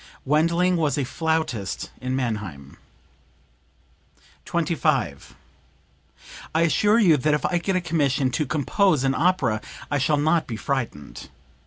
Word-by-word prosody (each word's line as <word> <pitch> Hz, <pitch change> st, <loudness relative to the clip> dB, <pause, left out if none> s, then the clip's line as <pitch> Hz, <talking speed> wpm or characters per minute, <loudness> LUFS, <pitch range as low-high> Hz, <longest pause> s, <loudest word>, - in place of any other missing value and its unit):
Wendling 170 Hz, +5 st, +2 dB
was 150 Hz, -4 st, 0 dB
a 140 Hz, -, 0 dB
flautist 155 Hz, -, -2 dB
in 130 Hz, 0 st, -2 dB
Mannheim.) 105 Hz, -, -4 dB, 1.7 s
25. 165 Hz, -3 st, -1 dB, 1.2 s
"I 160 Hz, -, +3 dB
assure 205 Hz, +6 st, +3 dB
you 180 Hz, -9 st, +5 dB
that 150 Hz, +3 st, +2 dB
if 150 Hz, -, -2 dB
I 175 Hz, -, +1 dB
get 190 Hz, +2 st, -1 dB
a 185 Hz, -, +1 dB
commission 145 Hz, -6 st, 0 dB
to 150 Hz, +2 st, -1 dB
compose 155 Hz, +2 st, +1 dB
an 135 Hz, 0 st, +2 dB
opera 135 Hz, -9 st, +1 dB, 0.3 s
I 145 Hz, -, +1 dB
shall 145 Hz, +3 st, +2 dB
not 155 Hz, +3 st, +1 dB
be 115 Hz, -4 st, -5 dB
frightened. 120 Hz, -, -4 dB
150 Hz, 130 wpm, -24 LUFS, 130-170 Hz, 1.7 s, you